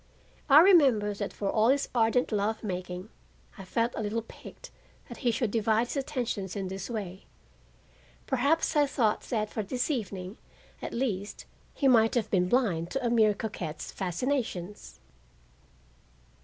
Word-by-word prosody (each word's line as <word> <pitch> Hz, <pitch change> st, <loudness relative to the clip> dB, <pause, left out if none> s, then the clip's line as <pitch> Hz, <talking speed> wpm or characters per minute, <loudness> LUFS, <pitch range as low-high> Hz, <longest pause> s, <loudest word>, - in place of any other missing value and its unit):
I 285 Hz, +3 st, +9 dB
remember 270 Hz, -, +5 dB
that 200 Hz, -, -4 dB
for 200 Hz, -1 st, -3 dB
all 220 Hz, 0 st, +3 dB
his 275 Hz, +2 st, +2 dB
ardent 240 Hz, +1 st, +2 dB
love 215 Hz, +2 st, -1 dB
making, 180 Hz, 0 st, -5 dB, 0.5 s
I -, -, -7 dB
felt 230 Hz, +5 st, -1 dB
a -, -, -3 dB
little 220 Hz, +2 st, -2 dB
piqued -, -, -13 dB, 0.4 s
that -, -, -10 dB
he 250 Hz, -, +1 dB
should 230 Hz, -1 st, 0 dB
divide 225 Hz, +1 st, +1 dB
his -, -, -3 dB
attentions 245 Hz, -9 st, -3 dB
in 195 Hz, -2 st, -3 dB
this 190 Hz, +2 st, -6 dB
way. 200 Hz, -5 st, -6 dB, 1.0 s
Perhaps 280 Hz, +7 st, +1 dB
I 295 Hz, -1 st, +4 dB
thought 225 Hz, -6 st, +1 dB
that 215 Hz, -3 st, -2 dB
for 220 Hz, -, -2 dB
this 245 Hz, +8 st, -2 dB
evening, 195 Hz, -6 st, -4 dB, 0.4 s
at -, -, -5 dB
least, 210 Hz, -5 st, -3 dB, 0.3 s
he 275 Hz, -, +1 dB
might 225 Hz, -3 st, +4 dB
have 225 Hz, -3 st, 0 dB
been 180 Hz, -2 st, +2 dB
blind 185 Hz, -10 st, +1 dB
to 270 Hz, +3 st, -3 dB
a 235 Hz, -, +1 dB
mere 215 Hz, -3 st, +4 dB
coquette's 180 Hz, -8 st, -5 dB
fascinations. 205 Hz, -1 st, -3 dB
220 Hz, 155 wpm, -28 LUFS, 195-250 Hz, 1.0 s, I